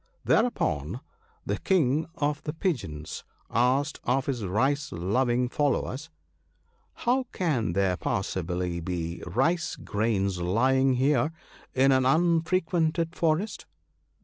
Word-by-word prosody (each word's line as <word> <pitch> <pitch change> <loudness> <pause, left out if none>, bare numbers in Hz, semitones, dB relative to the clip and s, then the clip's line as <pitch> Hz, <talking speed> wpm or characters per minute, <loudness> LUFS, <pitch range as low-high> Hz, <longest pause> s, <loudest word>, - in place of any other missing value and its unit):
Thereupon 240 +2 +1 0.5
the - - -2
King 155 - +2
of 145 0 -1
the 150 - -4
Pigeons 115 - -3 0.3
asked 130 +6 +1
of 130 +2 +1
his 125 -6 -2
rice 135 +10 0
loving 120 +8 +1
followers, 145 +2 -1 0.4
' - - -41
How 255 +2 +2
can 130 - 0
there 95 -1 +1
possibly 90 -2 -2
be 85 -1 -4
rice 155 - +1
grains 100 -3 -1
lying 130 +8 +3
here 140 +3 +2 0.4
in 135 +1 +5
an 130 -1 +3
unfrequented 165 +1 +1
forest 170 +5 0
130 Hz, 110 wpm, -27 LUFS, 100-160 Hz, 0.5 s, in